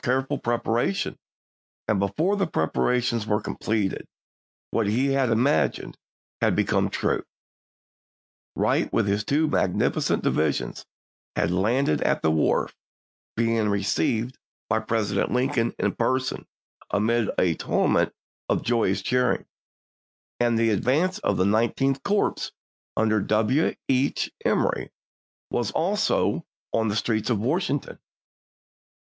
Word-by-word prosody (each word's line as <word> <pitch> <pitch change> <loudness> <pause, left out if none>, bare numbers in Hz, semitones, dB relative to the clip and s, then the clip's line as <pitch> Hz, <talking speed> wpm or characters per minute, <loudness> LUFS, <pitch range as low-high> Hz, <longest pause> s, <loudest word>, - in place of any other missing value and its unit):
careful 135 +3 0
preparation, 115 -3 0 0.7
and 105 -3 +2
before 150 - +1
the 195 -3 0
preparations 115 - 0
were 105 0 +2
completed 105 -3 -2 0.6
what 115 -3 +1
he 125 +7 +1
had 135 -2 +2
imagined 125 +6 +1 0.5
had - - +3
become - - +1
true: - - -1 1.3
Wright - - +1
with - - +2
his 100 +1 +1
two 150 +6 +1
magnificent 95 -11 +1
divisions 75 -2 -1 0.5
had 85 - +1
landed 105 - +1
at - - +1
the 80 - +3
wharf, 80 -1 +1 0.6
being 115 -2 +1
received 105 +5 0 0.3
by 110 - +1
Presi 110 - -12
Juiyiuse*. 105 -3 0
dent - - 0
Lincoln 125 -2 +1
in - - +1
person 130 +2 -1 0.4
amid 110 +2 +1
a 90 -2 +3
tumult - - +1 0.4
of - - +1
joyous 100 -5 +1
cheering; 125 +3 +1 0.9
and 120 -1 +2
the 115 0 +3
advance 150 - +1
of - - 0
the 95 - +2
Nineteenth 120 +6 +1
Corps 205 0 0 0.5
under 110 -1 +2
W. 110 +9 +1
H. 135 +1 +1
Emory - - +1 0.6
was 120 -4 0
also 195 -1 +1 0.3
in 110 0 +2
the 105 - -1
streets 110 0 0
of 115 - +2
Wash 155 - 0
ington. 140 0 -3
115 Hz, 125 wpm, -25 LUFS, 105-130 Hz, 1.3 s, had